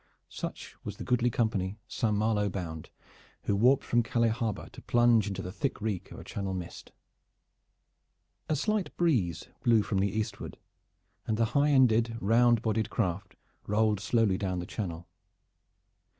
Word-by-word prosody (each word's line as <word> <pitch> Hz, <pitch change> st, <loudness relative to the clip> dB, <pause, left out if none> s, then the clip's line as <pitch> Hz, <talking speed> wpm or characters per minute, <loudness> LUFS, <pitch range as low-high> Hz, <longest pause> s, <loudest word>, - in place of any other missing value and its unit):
Such -, -, -6 dB
was -, -, -6 dB
the -, -, -6 dB
goodly 125 Hz, -1 st, +2 dB
company 110 Hz, -4 st, -1 dB
Saint 110 Hz, -3 st, 0 dB
Malo 105 Hz, -1 st, +1 dB
bound, 80 Hz, -5 st, -6 dB, 0.5 s
who 100 Hz, -, +1 dB
warped 125 Hz, +6 st, +4 dB
from 120 Hz, -, +2 dB
Calais 115 Hz, 0 st, +1 dB
Harbor 110 Hz, -2 st, -2 dB
to -, -, -12 dB
plunge 120 Hz, -3 st, +3 dB
into 95 Hz, -1 st, -4 dB
the 90 Hz, -, -5 dB
thick 135 Hz, +7 st, -2 dB
reek 105 Hz, -4 st, -3 dB
of -, -, -9 dB
a -, -, -9 dB
Channel 95 Hz, -2 st, -4 dB
mist. 90 Hz, -2 st, -8 dB, 1.6 s
A 155 Hz, -, +2 dB
slight 210 Hz, +6 st, -1 dB
breeze 105 Hz, -, +1 dB
blew 115 Hz, -4 st, +4 dB
from 100 Hz, -2 st, -1 dB
the 100 Hz, +1 st, +2 dB
eastward, 110 Hz, +2 st, -4 dB, 0.7 s
and 110 Hz, -, 0 dB
the 115 Hz, 0 st, +1 dB
highended, 125 Hz, -6 st, +4 dB
round 115 Hz, +2 st, +4 dB
bodied 110 Hz, -1 st, 0 dB
craft 90 Hz, +2 st, -2 dB, 0.3 s
rolled 105 Hz, 0 st, +2 dB
slowly 105 Hz, -2 st, +2 dB
down 95 Hz, -2 st, -1 dB
the 90 Hz, -, -3 dB
Channel. 85 Hz, -4 st, -5 dB
110 Hz, 150 wpm, -29 LUFS, 95-120 Hz, 1.6 s, warped